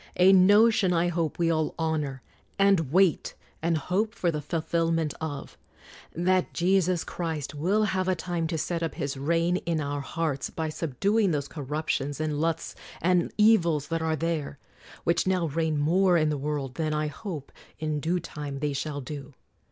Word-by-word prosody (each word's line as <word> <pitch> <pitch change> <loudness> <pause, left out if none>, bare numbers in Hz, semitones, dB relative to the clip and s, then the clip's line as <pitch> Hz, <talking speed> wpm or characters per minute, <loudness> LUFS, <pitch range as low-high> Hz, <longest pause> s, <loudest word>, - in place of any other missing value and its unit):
A 185 +2 +6
notion 205 +1 +5
I 170 +1 +2
hope 165 -3 -1
we 170 -1 +2
all 155 -1 0
honor, 150 -5 -2 0.3
and 195 -8 +3
wait, 185 -1 +2 0.3
and 165 0 +1
hope 205 +9 -1
for 175 - +1
the 150 -2 -3
fulfil 165 +1 -1
ment 160 -3 0
of: 145 -3 -6 0.6
That 185 +2 +1
Jesus 185 -1 +2
Christ 160 -5 -4
will 185 +9 +1
have 190 -3 0
a 185 - +2
time 170 -2 -2
to 160 - -2
set 170 +2 -2
up 165 -2 -2
His 140 0 -3
reign 165 +5 +1
in 165 -3 -2
our 145 -1 -2
hearts 150 -1 -2
by 160 -1 -3
subduing 195 - +1
those 145 -4 -1
corruptions 145 -1 -3
and 155 -1 -1
lusts 165 0 -1 0.3
and 180 0 +2
evils 170 -9 +4
that 165 0 -1
are 160 -1 0
there, 155 -3 -2 0.5
which 170 +2 +1
now 185 -2 +2
reign 160 +1 0
more 175 +5 +3
in 155 -1 +2
the 150 - 0
world 140 -3 -3
than, 155 -1 0
I 155 0 0
hope, 150 -1 -6 0.3
in 155 -1 -2
dae 165 +5 0
time 150 -4 -6
they 145 +1 -1
shall 145 +1 -3
do. 140 0 -8
165 Hz, 175 wpm, -27 LUFS, 150-180 Hz, 0.6 s, A